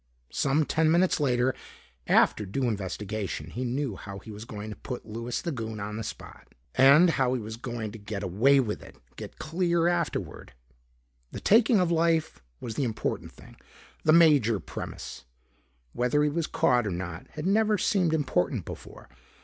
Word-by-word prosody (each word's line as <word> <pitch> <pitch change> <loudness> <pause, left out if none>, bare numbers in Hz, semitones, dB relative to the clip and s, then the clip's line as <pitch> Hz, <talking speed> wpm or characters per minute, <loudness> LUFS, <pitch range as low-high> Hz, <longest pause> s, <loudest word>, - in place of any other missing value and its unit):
Some 145 +3 +1
ten 160 +1 +2
minutes 175 +2 +3
later, 130 -2 +2 0.5
after 105 - +4
due 105 +8 -3
investigation, 100 -4 -4
he 125 - -4
knew 125 -2 -2
how 100 0 -8
he 110 +3 -10
was 105 +2 -8
going 105 -1 -7
to - - -6
put 125 -2 -7
Louis 115 +2 -4
the 170 - -2
Goon 110 -5 -5
on 105 +1 -5
the 115 - -4
spot. - - -9 0.3
And 145 +7 +7
how 130 -4 +1
he - - -1
was 110 0 -6
going 120 -2 -5
to 115 - -10
get 105 0 -5
away 115 +10 +4
with 110 -5 -2
it, - - -13 0.2
get - - -9
clear 170 +1 0
afterward. 175 - -2 0.8
The - - -6
taking 225 0 +4
of 180 -2 +1
life 165 - +1 0.2
was 115 - -5
the 135 - -1
important 115 -4 -3
thing, - - -16 0.5
the 155 - +4
major 145 - +5
premise. 60 -5 -8 0.7
Whether 125 +5 +1
he 150 - +3
was 165 +2 -2
caught 120 -3 +2
or - - -2
not 85 -2 -5
had 150 - -5
never 215 +2 +3
seemed 180 -4 +1
important 135 - 0
before. - - -10
125 Hz, 175 wpm, -27 LUFS, 105-160 Hz, 0.8 s, And